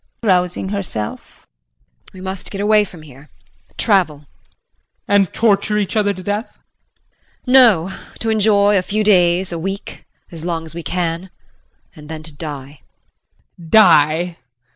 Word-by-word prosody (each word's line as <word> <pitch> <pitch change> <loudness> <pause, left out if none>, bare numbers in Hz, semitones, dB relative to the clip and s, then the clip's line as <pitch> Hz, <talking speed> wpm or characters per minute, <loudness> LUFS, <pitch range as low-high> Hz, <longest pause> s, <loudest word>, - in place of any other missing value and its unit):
JULIE 205 -4 +4
[Rousing 180 +1 -1
herself].We - - -7
must 190 0 -5
get 195 - -7
away 210 +1 +3
from 175 -5 -14
here 140 0 -15 0.5
travel. 185 -9 +2
JEAN. 145 0 -22 0.8
And 200 -3 +2
torture 210 -1 +1
each 205 0 -2
other 205 -2 +2
to 185 -2 -8
death? 205 +4 -4 0.9
JULIE. 250 - -1
No 210 -9 +5 0.2
to 225 - -2
enjoy, 205 -2 +3
a - - -1
few 215 +4 -1
days, 180 -3 +3
a 170 - -4
week 195 +4 -6 0.3
as 165 -2 -9
long 165 -2 -3
as 160 - -7
we 170 - -6
can. 175 +1 -3 0.7
And 150 -1 -13
then 160 -1 -7
to 155 -1 -9
die. 145 -2 -8 0.8
JEAN. 165 -2 -12
Die! 170 -4 +4
180 Hz, 145 wpm, -18 LUFS, 160-205 Hz, 0.9 s, No